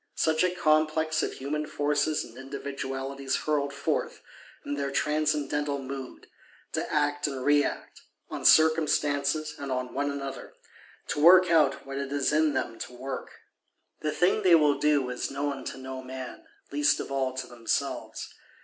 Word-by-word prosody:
Such 160 +1 +2
a 180 - +4
Complex 155 -2 +2
of - - -2
human 150 +3 -3
Forces 145 +1 0
and 115 - -13
Individualities 135 0 -4
hurled 145 -2 +1
forth, 140 0 -2 0.5
in 145 - -3
their 140 -1 -2
transcendental 150 0 0
mood, 135 -1 -7 0.5
to - - -2
act 145 0 +1
and 135 -3 -4
react, 145 0 +1 0.3
on - - -6
circumstances 155 -1 +3
and 140 -1 -5
on 125 -1 -2
one 145 +1 0
another; 140 -1 -6 0.5
to - - -1
work 180 +2 +7
out 155 -5 +3
what 135 0 -5
it 140 -1 -4
is 145 +1 +1
in 155 -2 +3
them 115 -3 -2
to - - -6
work. 130 +1 -6 0.7
The 155 - -2
thing 180 +7 +2
they 185 -4 +6
will 150 -3 +3
do 150 -3 +2
is 125 - -3
known 140 -1 -3
to - - -5
no 130 0 -6
man; 130 0 -8 0.3
least 145 0 +3
of - - -5
all 135 -1 0
to 130 - -3
themselves. 120 -2 -3
145 Hz, 160 wpm, -28 LUFS, 135-150 Hz, 0.7 s, work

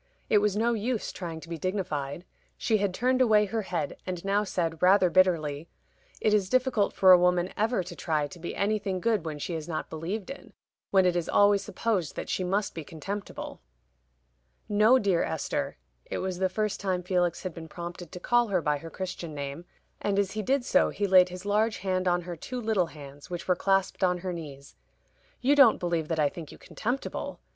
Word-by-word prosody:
It 210 - +6
was 205 -1 +1
no 235 +2 +2
use 230 +1 -2
trying 165 -3 -6
to - - -11
be 165 -1 -5
dignified. 175 -5 -3 0.3
She 220 - +1
had 200 -2 0
turned 255 +6 +1
away 215 -4 +5
her 220 +2 -2
head, 170 -7 -3
and 180 -1 -5
now 200 +1 +2
said, 165 -5 -2
rather 185 -1 +5
bitterly, 165 -5 +2 0.5
"It 215 - +2
is 200 -3 +2
difficult 255 -4 +2
for 190 -1 +5
a 180 - +9
woman 180 0 +2
ever 220 -2 +1
to 175 0 -9
try 155 -4 0
to 175 - -12
be 170 - -5
anything 200 -2 0
good 215 -3 0
when 155 -2 -4
she 160 +4 -4
is 160 -1 -4
not 160 -2 -4
believed 180 +8 -4
in 275 - -11 0.4
when 190 -1 +4
it 180 -1 +2
is 175 -2 -1
always 205 -1 +4
supposed 205 -6 -2
that - - -5
she 185 - -1
must 195 +3 -1
be 165 - -6
contemptible." 195 +7 -6 1.1
"No, 215 +5 +5
dear 195 -7 +2
Esther" 160 - -2 0.3
it - - -4
was 185 -1 -3
the 190 0 +2
first 215 +2 -2
time 185 -2 -1
Felix 175 -2 0
had 185 -3 -4
been 160 0 -9
prompted 175 0 -8
to 180 - -7
call 240 +4 +2
her 195 -3 +1
by 150 -2 0
her 165 - -9
Christian 175 -3 -6
name, 140 +4 -5 0.4
and 200 -1 0
as 200 -2 +1
he 215 - -3
did 260 +4 0
so 280 +1 +3
he 205 - -2
laid 185 -2 +6
his 180 +2 -9
large 215 +2 +1
hand 185 -1 -1
on 175 0 +2
her 175 0 -6
two 250 +10 -6
little 215 -6 +1
hands, 145 -3 -12
which 175 -1 -5
were 180 - +3
clasped 195 +1 +1
on 180 -1 +3
her 180 - -1
knees. 140 - -9 0.7
"You 275 +3 +4
don't 275 -6 +7
believe 170 -3 -1
that 160 -1 -1
I 150 - +4
think 155 +1 -8
you - - -12
contemptible. 245 +5 -4
185 Hz, 210 wpm, -28 LUFS, 170-210 Hz, 1.1 s, a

